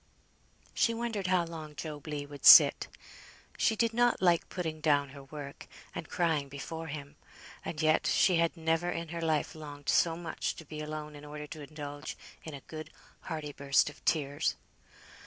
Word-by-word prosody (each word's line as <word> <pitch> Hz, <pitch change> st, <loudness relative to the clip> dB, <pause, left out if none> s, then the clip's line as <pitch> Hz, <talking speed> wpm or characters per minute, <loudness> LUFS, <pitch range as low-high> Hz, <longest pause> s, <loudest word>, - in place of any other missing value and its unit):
She 230 Hz, -, +2 dB
wondered 225 Hz, -5 st, -2 dB
how 180 Hz, -2 st, +3 dB
long 160 Hz, -2 st, -8 dB
Job 150 Hz, -1 st, -7 dB
Legh 145 Hz, -1 st, -4 dB
would 145 Hz, -1 st, -11 dB
sit. -, -, +9 dB, 0.7 s
She 225 Hz, -, +2 dB
did 230 Hz, +1 st, +1 dB
not 240 Hz, +1 st, +3 dB
like 175 Hz, -2 st, +3 dB
putting 160 Hz, -4 st, -4 dB
down 145 Hz, -2 st, +3 dB
her 140 Hz, 0 st, -11 dB
work, 140 Hz, 0 st, -9 dB, 0.3 s
and -, -, -6 dB
crying 160 Hz, -5 st, 0 dB
before 160 Hz, +4 st, -6 dB
him, 145 Hz, -1 st, -7 dB, 0.5 s
and 150 Hz, -, -5 dB
yet 155 Hz, 0 st, +3 dB
she 180 Hz, -3 st, +4 dB
had 170 Hz, +1 st, +1 dB
never 165 Hz, +2 st, 0 dB
in 165 Hz, -2 st, -4 dB
her 170 Hz, 0 st, -4 dB
life 160 Hz, -2 st, 0 dB
longed 145 Hz, -2 st, -8 dB
so 165 Hz, -1 st, +3 dB
much 170 Hz, -2 st, -3 dB
to 165 Hz, -, -10 dB
be 150 Hz, +1 st, -8 dB
alone 150 Hz, 0 st, -6 dB
in 145 Hz, -, -11 dB
order 150 Hz, 0 st, -7 dB
to 155 Hz, +1 st, -9 dB
indulge 145 Hz, 0 st, -7 dB, 0.3 s
in 160 Hz, -3 st, -7 dB
a 140 Hz, -, -9 dB
good 155 Hz, -1 st, -8 dB, 0.4 s
hearty 155 Hz, -3 st, -4 dB
burst 140 Hz, +1 st, +2 dB
of 145 Hz, -, -20 dB
tears. 145 Hz, -2 st, +1 dB
155 Hz, 175 wpm, -31 LUFS, 145-170 Hz, 0.7 s, sit